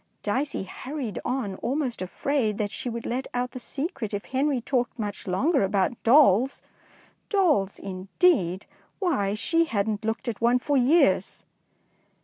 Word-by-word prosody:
'' -, -, -47 dB
Dicey 260 Hz, +3 st, -1 dB
hurried 255 Hz, +4 st, -5 dB
on, 245 Hz, -7 st, -2 dB
almost 260 Hz, -2 st, -2 dB
afraid 215 Hz, +3 st, -1 dB
that 205 Hz, -1 st, -2 dB
she 250 Hz, -, -4 dB
would 235 Hz, 0 st, -5 dB
let 255 Hz, +2 st, -2 dB
out 250 Hz, 0 st, -1 dB
the 255 Hz, -, -7 dB
secret 270 Hz, -, -3 dB
if 200 Hz, -, -5 dB
Henry 270 Hz, 0 st, 0 dB
talked 245 Hz, +1 st, -1 dB
much 205 Hz, -3 st, -5 dB
longer 270 Hz, -, +2 dB
about 195 Hz, +3 st, 0 dB
dolls. 255 Hz, -1 st, +4 dB, 0.7 s
Dolls, 310 Hz, -, +2 dB
indeed! 190 Hz, -, +1 dB, 0.3 s
why, 210 Hz, -, 0 dB
she 330 Hz, +10 st, +2 dB
hadn't 215 Hz, -4 st, -1 dB
looked 225 Hz, +4 st, -3 dB
at 230 Hz, -2 st, -3 dB
one 240 Hz, +2 st, +4 dB
for 285 Hz, +3 st, -1 dB
years 275 Hz, +6 st, +3 dB
240 Hz, 145 wpm, -26 LUFS, 205-275 Hz, 0.7 s, dolls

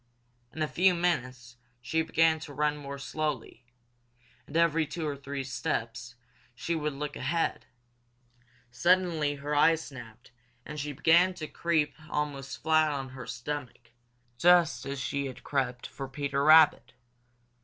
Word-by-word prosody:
In 155 Hz, -, -3 dB
a -, -, 0 dB
few 180 Hz, +3 st, +3 dB
minutes 130 Hz, -8 st, -2 dB, 0.2 s
she 125 Hz, +7 st, -1 dB
began 160 Hz, 0 st, +2 dB
to 150 Hz, -2 st, -9 dB
run 150 Hz, +1 st, +1 dB
more 140 Hz, -1 st, -7 dB
slowly, 135 Hz, -4 st, -4 dB, 0.8 s
and 150 Hz, -, -3 dB
every 165 Hz, -2 st, +3 dB
two 155 Hz, +1 st, -4 dB
or 145 Hz, -, -2 dB
three 140 Hz, 0 st, -5 dB
steps 120 Hz, -1 st, -4 dB, 0.4 s
she 165 Hz, +7 st, -3 dB
would 150 Hz, -2 st, -2 dB
look 145 Hz, +1 st, -5 dB
ahead. 165 Hz, +5 st, -1 dB, 1.0 s
Suddenly 165 Hz, +1 st, +2 dB
her 145 Hz, +1 st, -4 dB
eyes 160 Hz, +2 st, +4 dB
snapped, 120 Hz, -4 st, -12 dB, 0.3 s
and 150 Hz, 0 st, -7 dB
she 145 Hz, +1 st, -3 dB
began 170 Hz, +6 st, +4 dB
to 155 Hz, -, -5 dB
creep 155 Hz, -4 st, 0 dB, 0.2 s
almost 145 Hz, -2 st, -4 dB
flat 155 Hz, 0 st, +4 dB
on 135 Hz, -2 st, -4 dB
her 130 Hz, -2 st, -9 dB
stomach, 120 Hz, -1 st, -6 dB, 0.5 s
just 175 Hz, -3 st, +4 dB
as 140 Hz, 0 st, -4 dB
she 140 Hz, +2 st, -2 dB
had 130 Hz, -, -10 dB
crept 125 Hz, -3 st, -2 dB
for 135 Hz, -, -7 dB
Peter 140 Hz, +1 st, -2 dB
Rabbit. 155 Hz, 0 st, +6 dB
145 Hz, 145 wpm, -29 LUFS, 135-160 Hz, 1.0 s, Rabbit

